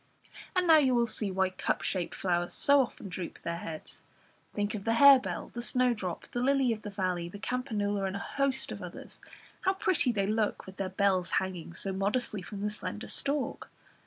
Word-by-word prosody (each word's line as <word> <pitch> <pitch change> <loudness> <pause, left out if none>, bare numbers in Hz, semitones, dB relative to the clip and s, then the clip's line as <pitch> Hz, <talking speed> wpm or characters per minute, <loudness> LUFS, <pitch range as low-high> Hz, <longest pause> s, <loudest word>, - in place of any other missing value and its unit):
And 365 0 +3
now 320 -2 +7
you 260 -4 +3
will 235 0 +3
see 215 -2 -2
why 190 0 +1
cup - - -1
shaped 180 -3 -2
flowers 175 -2 0
so 285 -1 +5
often 240 -5 -5
droop 180 -2 -6
their 170 0 -3
heads 160 -2 -8 0.5
think 205 0 -2
of 205 -3 -4
the 225 +1 +1
harebell, 275 +1 +6
the 240 - -6
snowdrop, 240 -7 +1
the 245 - -2
lily 270 -2 +3
of 215 - -7
the 210 - -6
valley, 185 -3 -2
the 205 - -9
campanula, 205 -3 -1
and 190 - -4
a 200 - -4 0.2
host 270 -1 +1
of - - -6
others; - - -9 0.4
how 380 0 +2
pretty 355 -9 +2
they 200 -4 0
look 215 +1 0
with 190 0 -11
their 190 -1 -2
bells 190 -1 +1
hanging 180 -3 -3
so 195 +1 -3
modestly 205 +2 -1
from 200 +2 -7
the 210 +1 -1
slender 210 +1 -6
stalk! 280 -1 -1
205 Hz, 195 wpm, -30 LUFS, 190-250 Hz, 0.5 s, now